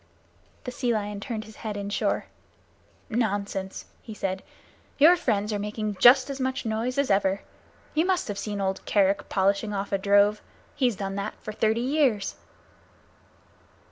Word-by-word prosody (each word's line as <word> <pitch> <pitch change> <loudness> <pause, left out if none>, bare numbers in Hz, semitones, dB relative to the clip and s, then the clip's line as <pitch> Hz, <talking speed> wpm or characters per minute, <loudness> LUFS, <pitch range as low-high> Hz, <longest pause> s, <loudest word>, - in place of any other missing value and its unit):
The 250 - -5
Sea 245 -1 -1
Lion 205 -1 -3
turned 220 -1 -5
his 220 0 -14
head 215 -2 -5
inshore. 200 0 -1 0.8
"Nonsense!" 205 -4 -2 0.2
he 220 - -9
said. 190 -2 -2 0.6
"Your 320 +5 +7
friends 215 - 0
are 205 - -1
making 210 0 -3
as 265 +2 +6
much 260 -1 -2
noise 225 +4 -1
as 280 -4 +2
ever. 195 0 +2 0.5
You 320 +3 +2
must 370 -1 +1
have 205 -2 -4
seen 205 0 -4
old 190 -1 -2
Kerick 200 -1 +2
polishing 200 +2 +1
off 195 0 -3
a 195 - +1
drove. 205 +1 +4 0.3
He's 250 -5 +1
done 195 0 -4
that 200 +1 -3
for 215 - -5
thirty 220 +2 +1
years." 255 -6 +1
210 Hz, 150 wpm, -26 LUFS, 200-245 Hz, 0.8 s, Your